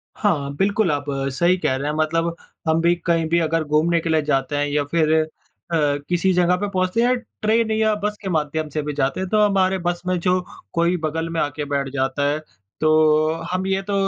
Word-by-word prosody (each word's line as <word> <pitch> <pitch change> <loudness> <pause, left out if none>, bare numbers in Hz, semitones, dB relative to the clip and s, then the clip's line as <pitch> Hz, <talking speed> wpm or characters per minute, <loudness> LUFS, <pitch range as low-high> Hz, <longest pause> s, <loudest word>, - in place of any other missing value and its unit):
हाँ, 145 -9 0
बिल्कुल, 200 0 +1
आप 145 - -2 0.3
सही 175 +5 +2
कह 130 -6 0
रहे 140 +2 -3
हैं। 150 - -2
मतलब 165 +2 0 0.3
हम 160 +1 +3
भी 170 +1 +3
कहीं 165 -1 +2
भी 170 0 +3
अगर 165 0 0
घूमने 155 +3 +2
के 165 - -4
लिए 160 -1 +3
जाते 145 -1 0
हैं, 145 0 0
या 145 0 0
फिर 160 -2 +3 0.6
अ, - - +1 0.3
किसी 180 +2 +2
जगह 180 0 +3
पे 205 - 0
पहुँचते 185 +3 0
हैं, 240 - +3
या - - +4 0.3
ट्रेन 220 +1 +2
या 220 0 +2
बस 210 0 -1
के 190 - -4
माध्यम 155 -1 -1
से 150 +1 -2
भी 150 0 -3
जाते 140 +3 -1
हैं, 190 -1 -3
तो 215 - +2
हमारे 190 -2 +3
बस 175 0 -1
में 185 -1 +1
जो 185 +1 +2 0.3
कोई 170 +2 +2
बगल 160 +2 -2
में 165 -1 -2
आके 145 0 -2
बैठ 140 -1 -1
जाता 135 +1 -1
है, 150 +1 -1 0.4
तो 155 0 +4 0.2
हम 185 +1 -1
ये 195 0 0
तो 200 - -2
165 Hz, 220 wpm, -21 LUFS, 150-185 Hz, 0.6 s, या